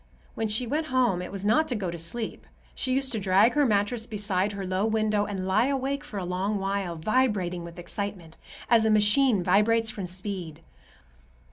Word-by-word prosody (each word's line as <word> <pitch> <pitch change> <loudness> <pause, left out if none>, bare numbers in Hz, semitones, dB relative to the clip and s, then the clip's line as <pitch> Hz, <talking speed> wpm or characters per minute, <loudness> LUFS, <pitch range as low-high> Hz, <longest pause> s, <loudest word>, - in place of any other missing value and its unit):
When 225 - -2
she 215 +4 0
went 305 +6 -2
home, 250 - +1
it 180 - -7
was 200 0 -4
not 235 +10 +3
to 255 - -2
go 190 -5 -3
to 170 - -6
sleep. 220 +8 -4 0.3
She 260 - -3
used 270 0 0
to 225 - -2
drag 195 +4 +4
her 290 -2 +3
mattress 220 +2 0
beside 205 -2 0
her 200 -1 -5
low 185 +1 -1
window 215 -1 +1
and 195 -3 -4
lie 215 +6 +2
awake 275 +1 -1
for 295 -8 -8
a 185 - -3
long 190 +4 -1
while, 195 -2 -2
vibrating 190 -2 0
with 170 +1 -10
excitement, 180 -2 -4 0.3
as 230 -2 +4
a 220 - +2
machine 215 0 +4
vibrates 220 +5 +3
from 195 -5 -5
speed. 180 -4 -5
205 Hz, 195 wpm, -26 LUFS, 185-230 Hz, 0.3 s, drag